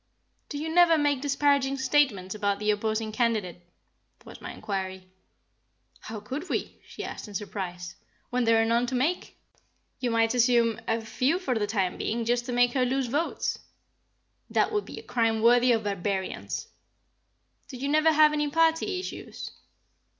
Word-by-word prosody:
"Do 290 - -5
you 320 +2 -3
never 345 -2 +6
make 290 -3 +1
disparaging 280 -1 +2
statements 265 -9 +1
about 205 -1 0
the 210 +1 +1
opposing 215 +1 -1
candidate?" 215 -7 -1 0.6
was - - -12
my - - -6
inquiry. 190 -2 -5 0.9
"How 220 -1 -7
could 280 - -6
we?" - - -3
she - - -8
asked - - -7
in 205 - -10
surprise, 180 -3 -5 0.4
"when 250 -1 +1
there 225 0 +4
are 225 - +3
none 235 +2 +2
to 260 - -2
make." 305 +9 -1 0.6
"You 250 -2 -1
might 230 0 +2
assume 235 -2 +3
a 225 0 0
few 255 +8 0
for 325 -9 -2
the 215 -3 -1
time 195 -4 -1
being; 230 +1 -2
just 240 +1 0
to - - -3
make 245 0 +3
her 260 - +2
lose 265 +1 0
votes." 290 +8 -2 0.9
"That - - +1
would 415 -1 -1
be - - -9
a - - -8
crime 225 -2 +1
worthy 245 +1 +5
of 225 -2 +2
barbarians." 195 -1 -3 1.0
"Do 260 - -8
you 270 +3 -3
never 310 +2 +4
have 305 0 +5
any 295 -1 0
party 325 +4 +2
issues?" 370 - -7
240 Hz, 165 wpm, -27 LUFS, 215-285 Hz, 1.0 s, never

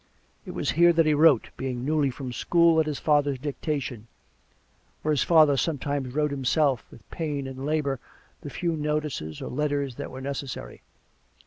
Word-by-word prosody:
It - - -7
was - - 0
here 170 +1 +5
that 165 -1 +3
he 155 - +3
wrote, 150 -5 +4
being 130 -2 -3
newly 150 -1 +2
from 130 -1 -6
school, 170 +3 +3
at 155 - +2
his 150 -2 -2
father's 145 -3 +2
dictation, 135 -4 -4 1.0
or 155 - +1
his 145 - +2
father 155 -4 +5
sometimes 140 -3 -2
wrote 150 -1 +1
him 135 -1 -4
self, 135 -1 +2
with 110 - -16
pain 150 -4 -3
and 135 +1 -6
labour, 145 -4 0 0.4
the 145 - -7
few 170 +2 -2
notices 150 - -3
or - - -5
letters 145 -1 -1
that - - -5
were 130 - -8
necessary. 140 -1 -6
145 Hz, 175 wpm, -26 LUFS, 135-155 Hz, 1.0 s, here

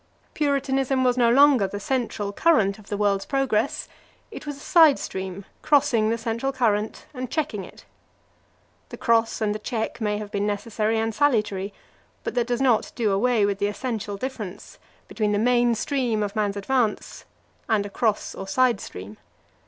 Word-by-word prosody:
Puritanism 270 -2 0
was 250 -1 +3
no 240 -2 +3
longer 265 -4 +5
the 205 +1 -6
central 215 -4 -2
current 220 -10 +2
of 205 - -16
the 205 - -2
world's 200 -1 +1
progress, 270 -2 0 0.4
it - - -9
was 290 -1 -4
a - - -14
side 315 -1 +5
stream 190 0 -6 0.2
crossing 265 -7 +3
the 230 - 0
central 230 +4 -2
current 220 -5 -1
and 255 -2 -5
checking 280 -9 -2
it. - - -14 1.0
The - - -8
cross 230 -1 +1
and 210 -1 +1
the 215 - -5
check 225 +1 -4
may 210 -1 0
have 210 -1 -7
been 200 +1 -1
necessary 215 +1 -1
and 225 0 -1
salutary, 210 -7 +1 0.5
but - - -3
that 240 -2 0
does 245 +1 -1
not 250 -5 +2
do 225 -4 +1
away 220 +2 +2
with 200 -1 -1
the 205 - +1
essential 210 -2 -4
difference 210 -5 -7 0.3
between 210 -2 -1
the - - +2
main 240 +1 +3
stream 240 -3 -1
of 200 -1 -4
man's 205 -2 0
advance 225 +1 -1 0.4
and 210 -2 +2
a - - -6
cross 220 0 0
or 195 - -7
side 235 +1 +2
stream. 95 +4 -9
225 Hz, 175 wpm, -24 LUFS, 205-255 Hz, 1.0 s, longer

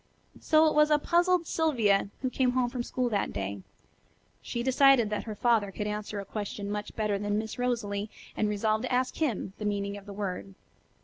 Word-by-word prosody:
So 315 0 +4
it 310 - +3
was 300 0 +5
a 300 - +5
puzzled 345 +3 +2
Sylvia 230 -13 +2
who 255 - 0
came 250 -1 +1
home 250 -1 +1
from 250 - -3
school 250 +1 -1
that 205 -3 -1
day. 100 0 -4 0.8
She 235 - -4
decided 260 -3 +5
that 210 - -2
her 215 -2 -5
father 225 -3 +2
could 210 +2 -4
answer 210 0 -4
a 200 - -6
question 205 0 -5
much 210 0 -4
better 210 -2 0
than 205 0 -1
Miss 220 +2 -4
Rosalie, 215 -4 -1 0.3
and 215 - +1
resolved 215 +2 0
to - - -4
ask 255 +1 0
him 240 - -1
the - - -5
meaning 200 -1 -2
of 200 0 -13
the 200 - -7
word. 195 -1 -5
215 Hz, 200 wpm, -29 LUFS, 205-255 Hz, 0.8 s, was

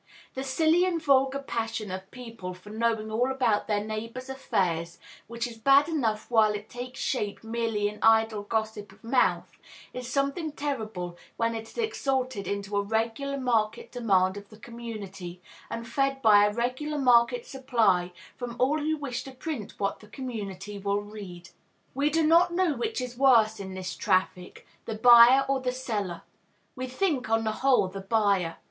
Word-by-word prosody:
The 265 - -4
silly 320 +6 +3
and 360 -2 0
vulgar 270 -3 +3
passion 225 -6 -4
of 190 +1 -6
people 230 -7 -8
for 185 +3 -13
knowing 220 -1 -1
all 245 +4 +1
about 250 -6 +1
their 205 -1 0
neighbors' 230 +5 -6
affairs, 170 -10 -1 0.3
which 235 0 -3
is 235 -2 -8
bad 275 +5 +5
enough 235 -10 -1
while 215 -2 +4
it 210 +1 -8
takes 250 +1 -7
shape 210 -6 -2
merely 225 -2 -1
in 210 +1 -7
idle 220 -1 +4
gossip 220 0 -3
of - - -21
mouth, 250 +2 +1 0.3
is 250 -1 -6
something 280 +3 -1
terrible 220 -12 -4 0.2
when 230 0 +1
it 225 0 -6
is - - -16
exalted 265 - -1
into 200 0 -3
a - - +3
regular 225 +7 -2
market 230 -5 0
demand 195 -5 +2
of 200 0 -10
the 215 - -14
community, 205 -6 -8 0.3
and 230 0 -5
fed 275 +1 0
by 205 -2 +7
a - - -1
regular 255 +7 -2
market 255 - +4
supply 225 - +1 0.2
from 245 -2 -6
all 280 +5 +2
who 310 +1 -1
wish 275 -5 -4
to 270 - -8
print 260 -4 -6
what 200 - -1
the 210 - -15
community 205 -4 -6
will 200 +1 -1
read. 195 -4 -10 0.4
We 280 +3 +1
do 320 +1 +2
not 340 +3 +5
know 350 -2 +1
which 440 - -3
is 250 -1 -6
worse 225 -5 +5
in 190 -1 -7
this 185 0 -5
traffic, 185 -2 -1 0.2
the 225 - -4
buyer 240 +4 +8
or 270 0 +1
the 250 -1 -1
seller; 215 -8 -4 0.5
we 255 -1 -4
think, 265 - -1
on 225 0 +2
the 220 - 0
whole, 265 -7 +4
the 195 +1 -7
buyer. 195 -5 +1
230 Hz, 175 wpm, -27 LUFS, 205-265 Hz, 0.5 s, buyer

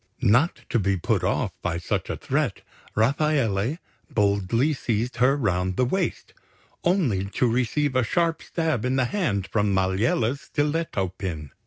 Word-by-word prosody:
Not 125 - +3
to 120 - +3
be 100 -1 +1
put 85 - 0
off - - 0
by 85 -1 -1
such 85 - -2
a - - -2
threat, - - -1 0.3
Rafaele 130 -1 +1 0.3
boldly 105 +7 +1
seized 120 -2 -2
her 130 +4 +4
round 95 -6 0
the 125 - +3
waist, 180 +7 -2 0.5
only 150 - +1
to 105 +5 0
receive 130 +4 0
a 130 - +3
sharp 165 +7 0
stab 160 -9 -1
in 125 +1 0
the 130 -1 +2
hand 120 - -1
from 105 0 0
Maliella's 110 +7 +1
stiletto 145 - -1
pin. 80 -7 -4
120 Hz, 150 wpm, -25 LUFS, 100-145 Hz, 0.5 s, her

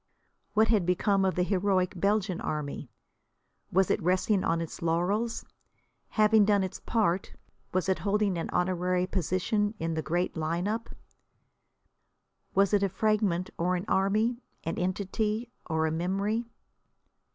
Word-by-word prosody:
What 220 +1 +4
had 215 -5 +3
become 195 +3 +2
of 190 -1 +1
the 180 - +2
heroic 185 0 +1
Belgian 195 0 0
Army? 150 -3 -4 0.8
Was 190 0 +3
it - - +1
resting 185 +3 +2
on 165 - +1
its 165 -1 -6
laurels? 185 +8 0 0.7
Having 215 0 +5
done 205 -2 +3
its 190 - -5
part, 195 -5 0 0.4
was 185 -1 0
it 190 -3 +1
holding 200 +1 +1
an 165 - -3
honorary 180 0 +1
position 195 +4 0
in 165 -2 -2
the 160 - -1
great 175 +4 -1
line 165 +3 -1
up? 225 +2 -2 1.7
Was 195 +1 +3
it 205 - +4
a 200 - +2
fragment 200 -3 0
or 180 +2 +1
an 180 +2 -3
army, 215 +6 +1 0.2
an 165 - -3
entity 210 +5 -1 0.2
or 160 -1 +1
a 160 - 0
memory? 200 +7 -1
190 Hz, 140 wpm, -29 LUFS, 175-210 Hz, 1.7 s, Having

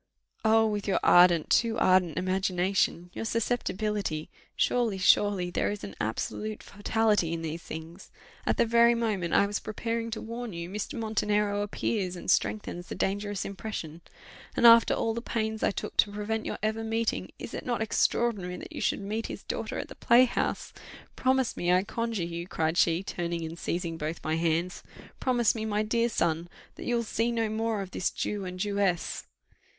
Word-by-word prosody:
Oh! 225 0 +5
with 210 -2 -2
your 195 - +2
ardent, 175 -2 +6
too 230 -1 +3
ardent 185 -6 +3
imagination 185 -1 0
your - - -4
susceptibility! 210 -7 -1 0.2
Surely, 235 -5 +1
surely, 190 -1 +3
there - - 0
is 205 -1 -5
an 100 - -6
absolute 210 - -3
fatality 205 -4 +1
in 165 0 -4
these 165 +1 -4
things! 165 +4 -9 0.3
At - - 0
the - - +4
very 235 +1 +5
moment 210 -7 0
I 200 - +5
was 205 +1 -2
preparing 230 +1 -3
to 225 - -4
warn 230 -1 -6
you, 170 +1 -6
Mr. 210 +7 -4
Montenero 210 -2 0
appears, 200 -2 -2
and 180 - -1
strengthens 180 -4 0
the - - -5
dangerous 205 0 -2
impression. 190 -5 -6 0.6
And - - +3
after 230 0 +8
all 225 - 0
the 235 - -4
pains 220 -2 -2
I - - +3
took - - -5
to 205 - +4
prevent 215 +2 -3
your - - -3
ever 220 +1 0
meeting, 225 0 -1
is - - -8
it - - -5
not 240 -3 -1
extraordinary 210 -4 0
that - - -9
you - - -5
should - - 0
meet 215 +3 -3
his - - -7
daughter - - -4
at - - -4
the - - -10
playhouse? 245 +1 +2 0.4
Promise 260 -1 +1
me, 175 0 0
I 180 +1 +4
conjure 230 -2 -2
you," 170 +1 -5
cried 160 -2 -1
she, 170 +1 +3
turning 170 -3 -3
and 165 +1 -7
seizing 170 -2 -3
both 155 +2 -4
my 155 - 0
hands, 165 +2 0 0.4
"promise 245 -4 +2
me, 220 - -4
my 210 -1 0
dear 230 +2 +1
son, 170 -5 0 0.2
that - - -9
you 240 - +2
will 235 - +1
see 230 +1 0
no 225 -2 0
more 220 -1 -1
of 190 - -10
this 185 - 0
Jew 205 -2 -3
and 180 0 -6
Jewess." 200 -3 -1
205 Hz, 185 wpm, -28 LUFS, 175-225 Hz, 0.6 s, after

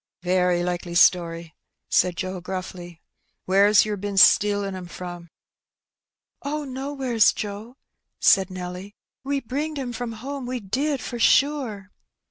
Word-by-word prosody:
" - - -68
Very 180 -1 +1
likely 175 -1 -3
story," 170 -2 +3 0.3
said 180 -2 +2
Joe 185 -1 -4
gruffly. 180 -2 -7 0.2
'' - - -49
Where's 200 +3 +5
yer 210 -1 -3
bin 200 0 -5
stealing 205 0 +4
'em 180 -1 -8
from?" 175 -1 -8 1.1
''Oh, 295 +1 -3
nowheres, 265 -3 +1
Joe," 215 +5 -7 0.4
said 195 -1 +4
Nelly. 185 +2 -7 0.3
"We 275 0 -1
bringed 290 +5 -4
'em 255 -3 -4
from 240 -1 -5
home, 265 +3 -6
we 250 0 -3
did, 265 +7 -2
for 240 - -6
sure." 240 -8 +2
205 Hz, 135 wpm, -24 LUFS, 180-255 Hz, 1.1 s, Where's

